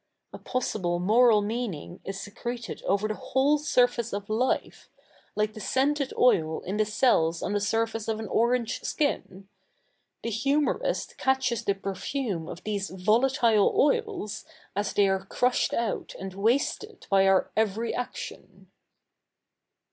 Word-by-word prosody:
A - - -8
possible 195 -8 -1
moral 215 +3 +4
mea?iing 205 -7 -4
is 195 0 -5
sec?'eted 235 +3 -6
over 200 +2 +1
the 215 - -2
whole 275 +6 +1
suiface 245 -5 +1
of 200 +1 -4
life, 245 +4 -1 0.5
like 210 0 0
the 215 - -9
scented 275 +4 0
oil 160 -10 +3
in 190 +3 -4
the 215 - +3
cells 175 -7 +2
on 205 - -2
the 205 - +1
surface 225 +1 -1
of 220 -1 -1
an 220 - -5
orange 235 0 +1
ski?i. 290 -2 0 1.0
The 230 - -2
humourist 285 - 0
catches 265 -4 +1
the 200 -2 +1
pe?fume 195 - -3
of 175 - -8
these 200 -2 -2
volatile 225 - +3
oils, 430 - 0 0.3
as 205 -1 -1
they 200 -1 +3
ai 190 0 +2
e 190 +1 -13
ci'ushed 250 0 +1
out 230 -3 -2
and 190 0 -6
wasted 250 - -1
by 195 0 +5
our 190 -1 +3
every 220 +1 0
action. 250 - -7
220 Hz, 140 wpm, -27 LUFS, 200-250 Hz, 1.0 s, by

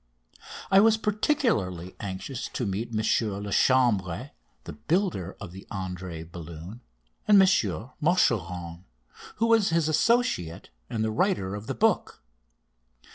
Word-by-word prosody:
I 195 - +7
was 220 +1 +5
particularly 210 - 0
anxious 105 +7 -5
to 125 - -2
meet 105 +4 -3
M. 110 -1 -1 0.4
Lachambre, 105 -1 +1 0.3
the - - -8
builder 155 - -1
of 90 - -8
the 95 +2 -12
Andrée 90 -3 -5
balloon, 85 +6 -9 0.5
and 205 -1 +7
M. 190 - +6 0.5
Machuron, 90 - 0 0.5
who 230 - +1
was 225 -3 +4
his 165 -1 +1
associate 155 - +1 0.2
and 110 -1 -2
the 110 - 0
writer 110 - 0
of 105 +2 -7
the - - -3
book. - - 0
110 Hz, 125 wpm, -27 LUFS, -, 0.5 s, I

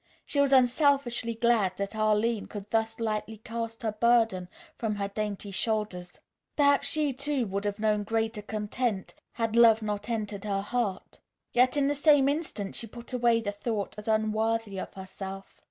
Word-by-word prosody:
She 285 - -1
was 280 -1 +4
unselfishly 255 -2 +3
glad 220 -5 +2
that 200 +2 -3
Arline 215 +1 +1
could 205 -1 -8
thus 225 0 0
lightly 220 -1 -2
cast 230 +1 -6
her 220 - 0
burden 225 -5 +2 0.3
from 220 -3 -2
her 200 -1 -2
dainty 205 0 -4
shoulders. 200 -4 -2 0.4
Perhaps 285 -1 +4
she, 300 -3 +1
too, 275 -1 0
would 200 0 -3
have 205 -1 -1
known 215 -1 +1
greater 225 0 -1
content, 210 0 -2 0.2
had 225 -1 -1
love 225 -2 +6
not 210 +1 -3
entered 210 -3 -3
her 195 -1 -1
heart. 210 -4 -3 0.3
Yet 255 +3 +4
in 280 -1 +3
the 290 - +2
same 290 -1 +5
instant 285 -10 -3
she 230 - -3
put 235 +3 -10
away 235 -2 +3
the 205 -2 -2
thought 205 0 -3
as 210 +1 -9
unworthy 220 -1 0
of - - -6
herself. 195 0 -8
220 Hz, 170 wpm, -28 LUFS, 205-240 Hz, 0.4 s, love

